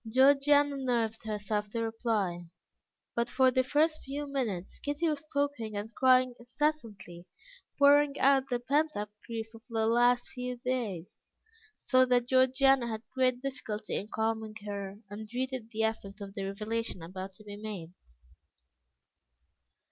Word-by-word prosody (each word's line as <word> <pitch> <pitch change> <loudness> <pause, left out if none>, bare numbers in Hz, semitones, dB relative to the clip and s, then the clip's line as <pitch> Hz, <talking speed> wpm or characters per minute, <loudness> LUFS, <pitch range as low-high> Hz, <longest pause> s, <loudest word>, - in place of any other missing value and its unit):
Georgiana 285 +2 +5
nerved 235 -4 -1
herself 210 0 -2
to 230 - -3
reply, 220 -6 -1 0.7
but 235 0 0
for 260 -1 +4
the 255 +1 +2
first 305 +4 +2
few 285 +2 -5
minutes, 235 -11 -3
Kitty 290 +4 -1
was 300 -2 -1
talking 280 -7 -1
and 215 +3 -5
crying 255 -1 +4
incessantly, 230 - -3 0.5
pouring 285 0 +5
out 270 0 +4
the 245 -2 0
pent 295 +4 +1
up 210 0 -4 0.2
grief 225 -1 -5
of 225 - -12
the 225 -1 0
last 240 +2 +3
few 250 0 -4
days, 235 -9 -4 0.5
so 255 -1 +3
that 245 -1 +3
Georgiana 260 0 +4
had 220 -1 -4
great 255 -1 +1
difficulty 220 -6 -4
in 205 - -2
calming 220 0 -2
her, 200 -1 -5
and 215 +1 -7
dreaded 250 0 -4
the 220 -1 -2
effect 220 -2 -3
of 200 -1 -8
the 195 -2 -4
revelation 215 -1 -3
about 185 +3 -7
to 215 - -16
be 205 -1 -8
made. 205 -5 -7
235 Hz, 145 wpm, -30 LUFS, 210-265 Hz, 0.7 s, Georgiana